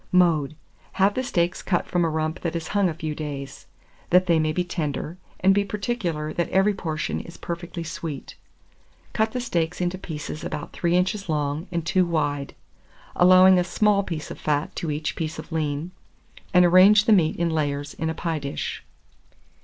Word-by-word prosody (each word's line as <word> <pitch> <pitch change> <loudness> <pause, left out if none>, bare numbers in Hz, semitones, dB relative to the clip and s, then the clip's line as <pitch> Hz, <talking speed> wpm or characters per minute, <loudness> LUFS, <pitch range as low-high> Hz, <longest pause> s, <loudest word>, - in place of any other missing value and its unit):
Mode. 160 -5 +3 0.4
Have 195 +1 +3
the 255 - -1
steaks 175 -6 0
cut 175 -3 0
from 175 -1 0
a 165 - +2
rump 155 +1 -2
that 170 -1 -3
has 165 -1 -4
hung 200 -2 +2
a - - -3
few 155 -1 -4
days, 145 -3 -7 0.4
that 180 +1 +5
they 170 -3 +3
may 155 0 +1
be 180 +3 0
tender, 160 -1 -4 0.2
and 190 +1 +5
be 200 +1 +2
particular 190 -7 -3
that 170 - -1
every 195 +3 +3
portion 160 -6 -3
is 170 - -10
perfectly 170 0 -5
sweet. 160 -3 -6 0.8
Cut 220 0 +1
the 250 - -1
steaks 175 -8 -1
into 180 +1 -1
pieces 155 -3 -6
about 150 - -5
3 175 0 +1
inches 190 +1 -1
long 150 +3 -1
and 170 -2 -2
2 185 +2 +3
wide, 145 -5 -1 0.6
allowing 185 +1 +7
a - - +2
small 200 +3 +2
piece 165 -6 -5
of - - -8
fat 150 0 -1
to 165 - -3
each 150 +1 -2
piece 160 -1 -4
of - - -9
lean, 155 +1 -2 0.6
and 180 0 +6
arrange 195 +4 +7
the 225 - +5
meat 165 -6 +3
in 170 -1 0
layers 145 -2 -2
in 160 - -3
a 160 - -3
pie 165 -1 -2
dish. 140 -1 -4
170 Hz, 185 wpm, -24 LUFS, 155-185 Hz, 0.8 s, allowing